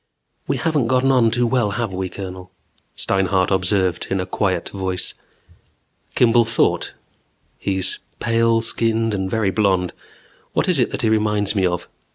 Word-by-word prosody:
"We - - 0
haven't 150 -7 0
gotten 130 +2 +3
on 125 -3 +4
too 120 +2 +1
well, 120 -3 +1
have 115 -5 -2
we, 95 0 -3
Colonel?" 90 0 -8 0.5
Steinhart 95 -1 +1
observed 95 -1 +1
in 95 - 0
a 90 - -2
quiet 95 -3 -1
voice. 95 -2 -4 1.0
Kimball 120 -1 +5
thought: 115 - 0 0.7
He's 95 -2 0 0.2
pale 115 0 +2
skinned 115 -1 0
and 95 -1 -2
very 105 -2 +1
blond. 95 -4 +1 0.6
What - - +1
is 180 -6 +3
it 125 - +2
that 135 - -3
he 110 - +3
reminds 105 -2 +1
me 95 -3 +2
of? 90 0 -3
105 Hz, 155 wpm, -21 LUFS, 95-115 Hz, 1.0 s, Kimball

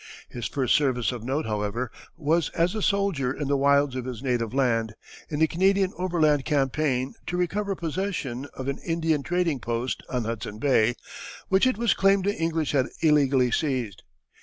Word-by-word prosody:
His 120 -1 -4
first 130 -3 0
service 130 -5 +2
of 120 -3 -6
note, 135 +5 -1
however, 110 +3 -2 0.3
was 165 +1 +1
as 170 +3 +2
a 215 - -3
soldier 195 -11 +1
in 145 +1 -4
the 140 - +2
wilds 140 -1 +3
of 130 -1 -4
his 125 -1 -6
native 120 -4 0
land, 115 -4 +1 0.3
in 150 - -3
the 160 - +5
Canadian 190 +3 +2
overland 160 -6 +2
campaign 135 -2 0
to 175 - -2
recover 195 +3 -1
possession 165 -7 -3
of 130 - -6
an 140 - -2
Indian 165 -3 0
trading 175 -2 0
post 120 +2 -2
on 125 -2 -1
Hudson 110 -2 -4
Bay, 120 -2 +3 0.5
which 190 +6 +4
it 255 - +1
was 235 0 +2
claimed 195 0 +3
the 205 - +2
English 165 -2 -1
had 135 -3 +2
illegally 140 -5 +3
seized. 125 -10 -1
140 Hz, 175 wpm, -26 LUFS, 125-170 Hz, 0.5 s, the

